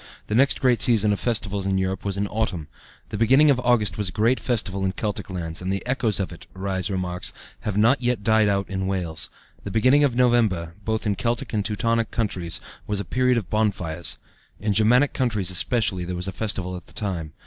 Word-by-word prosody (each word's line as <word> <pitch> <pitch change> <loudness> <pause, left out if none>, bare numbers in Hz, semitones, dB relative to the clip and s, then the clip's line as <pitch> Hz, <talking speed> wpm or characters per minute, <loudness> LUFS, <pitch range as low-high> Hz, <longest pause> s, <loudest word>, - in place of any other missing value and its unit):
The - - -4
next 135 +5 +3
great 125 -3 +3
season 105 -3 +5
of 100 - -3
festivals 100 -5 -2
in 95 0 +1
Europe 95 0 -2
was 100 -1 -2
in 100 - 0
autumn. 95 -8 -2 0.4
The 105 - -5
beginning 135 +6 +5
of 130 - +1
August 110 -7 +1
was 105 -3 +1
a - - -7
great 115 +6 +2
festival 100 -6 -1
in 95 0 0
Celtic 105 -1 -4
lands, 85 -3 -3
and 95 +1 -2
the 100 - -3
echoes 120 -6 +1
of 95 - -2
it, 85 - -12
Rhys 95 0 -2
remarks, 90 -2 -2 0.3
have 105 -2 -3
not 115 +7 +4
yet 120 -4 0
died 110 -1 +4
out 100 -1 0
in 95 -1 -3
Wales. 90 -5 -2 0.3
The - - -5
beginning 130 +8 +4
of 135 -4 +2
November, 110 -10 +2
both 110 +1 -2
in 105 - +2
Celtic 120 +1 -2
and 105 -2 0
Teutonic 115 +2 0
countries, 90 -7 -2 0.3
was 105 -1 0
a 100 - -3
period 125 +7 +2
of 105 -6 -4
bonfires. 95 -6 -1 0.4
In 105 0 0
Germanic 120 +7 +4
countries 110 -8 0
especially 95 -1 +1
there 90 +1 -4
was 90 +2 -2
a - - -2
great 90 - -18
festival 95 -4 -2
at 90 - -10
the - - -16
time. 85 -7 -4
105 Hz, 215 wpm, -24 LUFS, 95-115 Hz, 0.4 s, season